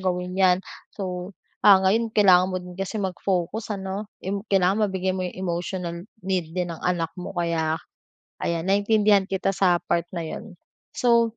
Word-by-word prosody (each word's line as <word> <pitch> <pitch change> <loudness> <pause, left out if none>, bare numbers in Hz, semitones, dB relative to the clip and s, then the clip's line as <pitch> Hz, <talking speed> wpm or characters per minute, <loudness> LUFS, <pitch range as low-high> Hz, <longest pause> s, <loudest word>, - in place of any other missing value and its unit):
gawin 180 -1 -1
'yan. 185 -1 +4 0.4
So, 185 -1 -4 0.3
ah, 200 -2 +8
ngayon 225 +4 +2
kailangan 185 -3 +6
mo 185 - -2
din 180 0 -10
kasi 195 +3 -3
mag-focus 195 +2 -2
ano. 195 +2 -5 0.2
Im 200 +1 -2
kailangan 195 +2 +3
mabigay 190 -1 -1
mo 185 - -3
yung 180 - -8
emotional 175 -1 -3 0.3
need 185 -4 -1
din 175 -1 -1
ng 165 - -9
anak 175 -2 0
mo, 180 +2 -6
kaya 165 -2 0 0.7
ayan, 165 -1 -1
naintindihan 205 0 +4
kita 195 0 0
sa 180 -2 +3
part 170 -1 0
na 170 -2 -3
'yon. 180 +3 -8 0.4
So, 235 -2 +3
185 Hz, 165 wpm, -24 LUFS, 180-200 Hz, 0.7 s, ah